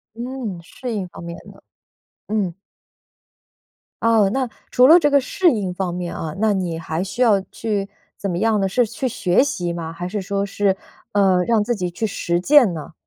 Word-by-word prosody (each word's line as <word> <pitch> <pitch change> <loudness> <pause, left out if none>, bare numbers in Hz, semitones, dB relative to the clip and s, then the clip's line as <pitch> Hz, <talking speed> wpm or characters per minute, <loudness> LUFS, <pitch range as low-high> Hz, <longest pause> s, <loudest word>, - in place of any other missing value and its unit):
嗯， 235 -7 -5
适 240 +7 -7
应 195 -4 -3
方 175 - -11
面 170 0 -7
的， - - -19 0.7
嗯。 200 -5 -1 1.5
哦， 225 -3 +4
那 260 -3 -1 0.2
除 250 +1 +6
了 330 +3 +9
这 295 -3 +2
个 280 - +5
适 350 +6 +2
应 200 -6 -2
方 180 -1 -3
面 175 -1 -4
啊， 155 -2 -4
那 215 -1 +3
你 180 -4 -2
还 160 +2 -3
需 195 +6 -5
要 220 -5 +5
去 205 -3 -2 0.3
怎 200 - -3
么 175 - -2
样 220 0 +2
呢？ 195 - +1
是 245 +6 +2
去 250 +4 -3
学 205 -1 +2
习 175 -11 -2
吗， 165 -1 -5
还 175 +1 -5
是 210 +2 -3
说 200 +1 -2
是， 200 -1 +1 0.4
呃， 190 -3 +3
让 225 -1 +2
自 240 +3 -1
己 180 -4 -3
去 220 +5 -2
实 175 -4 -1
践 245 -2 +5
呢？ 155 0 -8
200 Hz, 205 characters per minute, -21 LUFS, 180-230 Hz, 1.5 s, 了